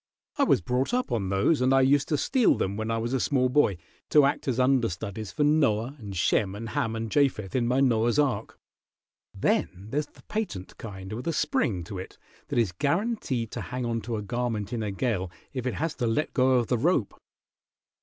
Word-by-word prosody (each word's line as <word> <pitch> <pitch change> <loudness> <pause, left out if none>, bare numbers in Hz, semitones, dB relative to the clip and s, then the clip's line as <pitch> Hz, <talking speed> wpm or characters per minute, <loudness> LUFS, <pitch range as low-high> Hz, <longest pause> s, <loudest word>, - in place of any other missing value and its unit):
I - - +5
was - - +3
brought 125 - 0
up 250 - -1
on 105 -6 -1
those, 100 +10 +2
and 130 +1 +4
I 135 - +5
used 140 +2 +3
to 150 - +1
steal 255 - +3
them 95 +1 -1
when 110 +1 -3
I 115 - 0
was 115 +3 -2
a 130 - +1
small 130 0 +2
boy, 125 -8 +3 0.3
to 150 -2 +6
act 140 - -1
as 130 -1 0
understudies 110 -6 0
for 150 - 0
Noah 140 -5 +2
and 100 -4 -7
Shem 95 +2 +1
and 115 +2 -6
Ham 115 +1 -1
and 115 -1 -4
Japheth 130 -8 +1
in 120 -2 +1
my 130 +2 +2
Noah's 120 -2 +2
ark. 145 -3 0 0.7
Then 95 +4 -1
there's 145 +1 -1
the - - -21
patent 155 - -4
kind 95 -2 -7
with 120 +8 -5
a 165 - +1
spring 115 - 0
to 95 +2 -7
it 95 - -9 0.3
that - - -3
is 115 -6 +2
guaranteed 140 - -1
to - - -4
hang 125 0 -4
onto 115 0 -2
a 105 - -3
garment 115 -1 -2
in 115 - -2
a 105 - -2
gale 100 -3 -1 0.2
if 130 -2 -3
it 125 - -2
has 160 +1 -1
to 120 - 0
let 115 +7 0
go 130 0 +3
of 125 -2 +3
the 125 +1 0
rope. 140 - +1
120 Hz, 215 wpm, -27 LUFS, 105-135 Hz, 0.7 s, to